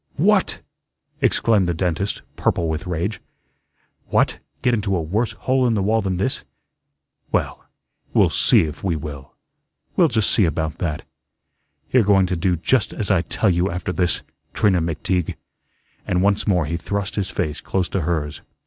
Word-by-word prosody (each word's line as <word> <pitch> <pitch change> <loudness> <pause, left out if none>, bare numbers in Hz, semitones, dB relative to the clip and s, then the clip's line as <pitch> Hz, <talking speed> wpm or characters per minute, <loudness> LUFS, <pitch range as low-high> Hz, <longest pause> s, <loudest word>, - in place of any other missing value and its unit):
"What!" - - +2 0.6
exclaimed 105 -5 +3
the 85 - 0
dentist, 90 +3 -1
purple 85 - 0
with 80 +3 -3
rage. 90 +5 -2 0.9
"What, - - +1 0.2
get 125 - +3
into 100 -4 0
a 85 - 0
worse 105 +9 -1
hole 130 -1 +1
in 115 - +2
the 100 - 0
wall 110 +3 +2
than 95 -2 -1
this? 100 +8 -1 0.9
Well, - - -1 0.5
we'll - - +4
SEE - - +4
if 75 -2 -4
we 90 -4 0
will. 70 -3 -7 0.6
We'll - - +5
just 110 -2 +1
see 105 - +4
about 80 -1 -2
that. 75 -4 -2 0.9
You're 130 - +5
going 100 -2 +4
to 90 0 -1
do 90 +1 +1
just 130 +10 +1
as 105 -2 -1
I 95 -4 +4
tell 100 +2 +1
you 90 +2 +1
after 90 +1 -3
this, 90 -2 0 0.3
Trina 95 -5 +3
McTeague," 85 +2 -1 0.7
and 90 0 +1
once 100 +2 +2
more 90 -6 +2
he 85 +3 -2
thrust 100 +3 -3
his 100 -2 -2
face 80 -2 -3
close 95 -2 -1
to 95 - -1
hers. 75 -3 -2
90 Hz, 165 wpm, -22 LUFS, 85-100 Hz, 0.9 s, We'll